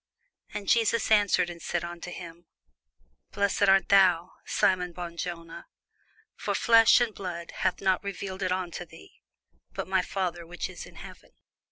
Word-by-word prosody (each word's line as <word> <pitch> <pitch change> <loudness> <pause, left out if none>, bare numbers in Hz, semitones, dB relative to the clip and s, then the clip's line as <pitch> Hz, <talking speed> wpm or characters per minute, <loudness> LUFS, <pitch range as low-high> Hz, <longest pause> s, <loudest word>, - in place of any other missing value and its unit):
And 205 -1 -6
Jesus 230 0 +2
answered 205 -4 +4
and 170 -1 -9
said 175 -1 -2
unto 170 +1 -7
him, 170 -1 -10 0.9
Blessed 200 0 +2
art 195 0 +4
thou, 185 -2 +4 0.2
Simon 180 -2 +1
Bar 175 0 -6
jona: 170 -1 -7 0.7
for - - -3
flesh 230 0 +6
and 240 -3 0
blood 175 -4 -6
hath - - 0
not 190 -1 +1
revealed 195 -1 -5
it 185 -1 0
unto 185 -1 -3
thee, 80 - -17 0.5
but - - -4
my 190 -1 +2
Father 180 -2 -3
which 175 +1 -5
is - - -9
in - - -16
heaven. - - -12
180 Hz, 155 wpm, -28 LUFS, 170-195 Hz, 0.9 s, flesh